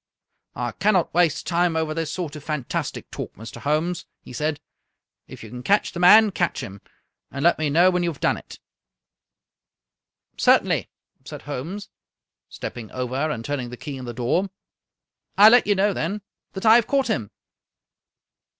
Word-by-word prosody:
" - - -52
I - - -3
cannot 195 -4 +1
waste 165 -2 +2
time 175 -1 +1
over 160 -1 -1
this 160 -1 -3
sort 160 -3 -4
of 150 - -9
fantastic 150 -5 -4
talk, - - -7
Mr. 115 +3 -10
Holmes," 160 +4 -1
he - - -13
said. 150 +3 -2 0.3
" - - -61
If - - -11
you 110 - -11
can 125 0 -7
catch 200 +11 +2
the 175 - -7
man, 210 +4 +7
catch 175 -3 -1
him, 100 +1 -9 0.5
and 140 0 -5
let 170 - +4
me 155 -2 0
know 175 +5 +5
when 180 0 0
you 175 - 0
have 155 - -8
done - - +2
it." - - -12 0.9
" 60 +1 -67 0.2
Certainly," - - +3 0.3
said - - -9
Holmes, 150 +9 -6 0.6
stepping 115 -3 -7
over 125 -1 -4 0.2
and 115 -6 -4
turning 135 -4 -3
the 125 - -9
key 145 0 -7
in 130 -1 -7
the 120 - -5
door. 125 - 0 0.4
" - - -51
I 210 +2 +9
let 245 -1 +5
you 205 - +3
know, 200 +1 +2
then, 195 +5 -3 0.3
that 190 +2 -6
I 220 - +8
have 235 - +1
caught 275 -1 +1
him!" 110 -5 -2
160 Hz, 185 wpm, -23 LUFS, 130-185 Hz, 0.9 s, I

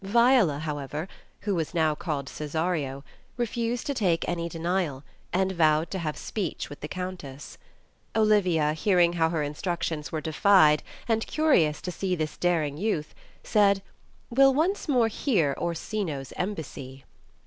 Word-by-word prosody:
Viola, 235 - +4
however, 150 +1 -4 0.3
(who 205 -1 -1
was 165 -1 -2
now 160 -2 +3
called 150 -3 -3
Cesario, 150 -3 -2 0.2
) - - -34
refused 235 0 -2
to 285 - -1
take 180 -9 +1
any 170 -1 -2
denial, 165 -4 -2 0.3
and 190 +1 +1
vowed 160 -2 +2
to 190 - -2
have 155 -3 -3
speech 190 -8 -4
with 145 - -9
the 150 - -5
Countess. 180 -7 -7 0.6
Olivia, 185 -9 +3
hearing 175 +1 +3
how 165 -2 +2
her 160 -2 -1
instructions 150 0 -3
were 160 - -2
defied 155 -1 +4 0.3
and 225 -1 0
curious 185 - +2
to 180 - -3
see 185 +1 -1
this 155 -2 -3
daring 160 -5 0
youth, 170 -5 -2 0.3
said, 200 -2 +3 0.5
"We'll 270 +2 +5
once 345 +8 0
more 245 -5 +4
hear 205 - +1
Orsino's 170 - -3
embassy.' 140 -8 -5
170 Hz, 145 wpm, -27 LUFS, 150-205 Hz, 0.6 s, We'll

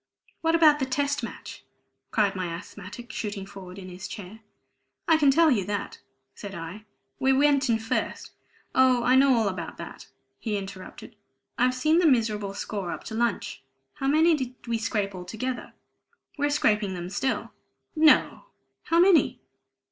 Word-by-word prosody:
"What 325 0 +2
about 305 -3 +6
the 265 - -1
Test 280 +2 0
Match?" - - -8 0.5
cried 205 -3 +1
my 185 -1 -2
asthmatic, 200 +6 -8
shooting 205 -3 -4
forward 195 -2 -11
in 190 -2 -9
his 185 +1 -8
chair. 205 +2 -9 0.7
"I 325 - +6
can 290 -3 +4
tell 320 +3 +5
you 210 -7 +2
that," 205 0 -4 0.3
said 200 -2 -8
I. 170 +6 -8 0.3
"We 265 0 +3
went 280 -1 +3
in 230 - +3
first 225 0 -3 0.2
" - - -31 0.2
"Oh, 255 -2 +4
I 255 +1 +4
know 270 0 +5
all 225 -3 +2
about 180 -4 -5
that," - - -9 0.3
he 215 -2 -2
interrupted. 195 -1 -9 0.4
"I've 255 0 +2
seen 310 +6 +3
the 350 - +4
miserable 215 -6 +1
score 200 -3 -4
up - - -5
to - - -8
lunch. 230 -9 -1 0.4
How 270 - -2
many 320 +4 +5
did 255 -4 -3
we 230 -1 -1
scrape 210 -3 -1
altogether?" 220 +8 -5 0.6
"We're 290 0 0
scraping 210 -9 +1
them 175 +1 -6
still." 265 +5 -2 0.4
"No! 310 +9 +4 0.4
How 335 - +2
many?" 355 -2 +4
230 Hz, 165 wpm, -26 LUFS, 200-275 Hz, 0.7 s, about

